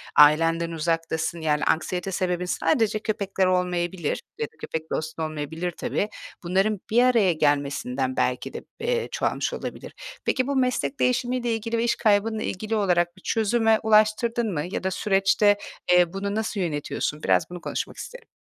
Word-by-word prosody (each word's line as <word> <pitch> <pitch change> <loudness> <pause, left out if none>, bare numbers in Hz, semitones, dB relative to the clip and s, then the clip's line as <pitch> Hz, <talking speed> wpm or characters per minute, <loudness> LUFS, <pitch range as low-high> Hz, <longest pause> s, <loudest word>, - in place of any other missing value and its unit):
ailenden 165 +3 +5
uzaktasın. 165 0 -1
Yani 150 -1 +1
anksiyete 180 +3 0
sebebin 180 -1 -1
sadece 215 +5 +1
köpekler 200 -3 -1
olmayabilir 180 -2 0 0.2
ya - - -1
da - - -29
köpek, 160 0 -5
dostun 160 +1 -3
olmayabilir 155 +3 -3
tabii. 205 +4 -2 0.3
Bunların 195 +4 +1
bir 240 +3 +4
araya 230 -8 +4
gelmesinden 140 -4 0
belki 125 0 -1
de, - - -6 0.2
eee, 475 0 0
çoğalmış - - -1
olabilir. - - -6 0.3
Peki, 255 -1 +1
bu 280 - -1
meslek 255 +1 0
değişimiyle 250 -1 +1
ilgili 230 +1 -2
ve 230 - +1
iş 235 - +2
kaybınla 215 +1 +2
ilgili 215 +4 -3
olarak 175 -3 +1
bir - - -16
çözüme 225 +1 +2
ulaştırdın 220 +1 +3
mı 150 - -1
ya - - -3
da 190 - 0
süreçte, 195 +2 +3 0.3
eee, 180 -1 +5
bunu 200 +1 -3
nasıl 220 -1 -2
yönetiyorsun? 155 -5 -2 0.2
Biraz 165 - +2
bunu 175 0 -8
konuşmak - - -4
isterim. - - -9
190 Hz, 155 wpm, -25 LUFS, 165-220 Hz, 0.3 s, ailenden